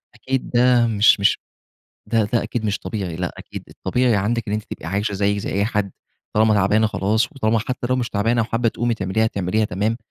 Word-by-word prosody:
أكيد 130 Hz, -1 st, -3 dB
ده 120 Hz, -1 st, +4 dB
مش 110 Hz, -1 st, +4 dB
مش 100 Hz, -, +3 dB, 0.7 s
ده 115 Hz, -2 st, +2 dB
ده 115 Hz, +3 st, 0 dB
أكيد 120 Hz, -2 st, -4 dB
مش 105 Hz, -1 st, 0 dB
طبيعي 95 Hz, -6 st, -4 dB
لأ، 90 Hz, 0 st, -3 dB
أكيد -, -, -8 dB
الطبيعي 125 Hz, -3 st, 0 dB
عندك 115 Hz, +4 st, 0 dB
إن 105 Hz, -, 0 dB
أنتِ 105 Hz, -1 st, -3 dB
تبقي -, -, -8 dB
عايشة 100 Hz, +3 st, -1 dB
زي 100 Hz, +1 st, 0 dB
زي -, -, -4 dB
أي 100 Hz, +1 st, +1 dB
حد 105 Hz, -2 st, -1 dB, 0.4 s
طالما 110 Hz, 0 st, +4 dB
تعبانة 105 Hz, +2 st, +3 dB
خلاص، 110 Hz, -, 0 dB
وطالما 115 Hz, -5 st, +1 dB
حتى 125 Hz, +2 st, -3 dB
لو 130 Hz, -, +3 dB
مش 120 Hz, -2 st, -1 dB
تعبانة 115 Hz, +4 st, +1 dB
وحابة 115 Hz, +2 st, 0 dB
تقومي 120 Hz, +1 st, -1 dB
تعمليها 105 Hz, +1 st, 0 dB
تعمليها 105 Hz, +1 st, 0 dB
تمام، 105 Hz, +3 st, -1 dB
110 Hz, 200 wpm, -21 LUFS, 100-115 Hz, 0.7 s, ده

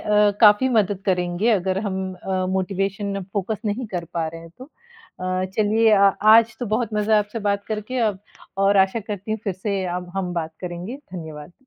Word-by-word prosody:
अ, 210 Hz, 0 st, +3 dB
काफ़ी 210 Hz, +3 st, +6 dB
मदद 205 Hz, -5 st, +1 dB
करेंगे 180 Hz, +3 st, +1 dB
अगर 190 Hz, -3 st, +1 dB
हम 190 Hz, -1 st, -2 dB
अ, 185 Hz, 0 st, -2 dB
मोटिवेशन 195 Hz, +1 st, -2 dB
फोकस 205 Hz, +1 st, -2 dB
नहीं 215 Hz, +4 st, -2 dB
कर 180 Hz, -5 st, -4 dB
पा 165 Hz, -1 st, 0 dB
रहे 165 Hz, +1 st, -9 dB
हैं 165 Hz, 0 st, -13 dB
तो। 255 Hz, -, -9 dB, 0.6 s
अ, 185 Hz, 0 st, -1 dB
चलिए 220 Hz, +1 st, +3 dB
अ, 200 Hz, -1 st, +6 dB
आज 220 Hz, +1 st, +6 dB
तो 245 Hz, -, -2 dB
बहुत 220 Hz, +1 st, -1 dB
मज़ा 210 Hz, +1 st, +3 dB
आपसे 210 Hz, +2 st, -3 dB
बात 200 Hz, 0 st, 0 dB
करके 220 Hz, +4 st, -3 dB
औ -, -, -8 dB, 0.4 s
और 195 Hz, +1 st, +3 dB
आशा 190 Hz, +3 st, +3 dB
करती 205 Hz, 0 st, -6 dB
हूँ 215 Hz, -, -1 dB
फिर 200 Hz, -, -1 dB
से 195 Hz, 0 st, -2 dB
अब 180 Hz, 0 st, -4 dB
हम 185 Hz, -2 st, -2 dB
बात 160 Hz, -1 st, -3 dB
करेंगे, 180 Hz, +6 st, -6 dB
धन्यवाद। 160 Hz, -, -9 dB
200 Hz, 190 wpm, -22 LUFS, 185-215 Hz, 0.6 s, काफ़ी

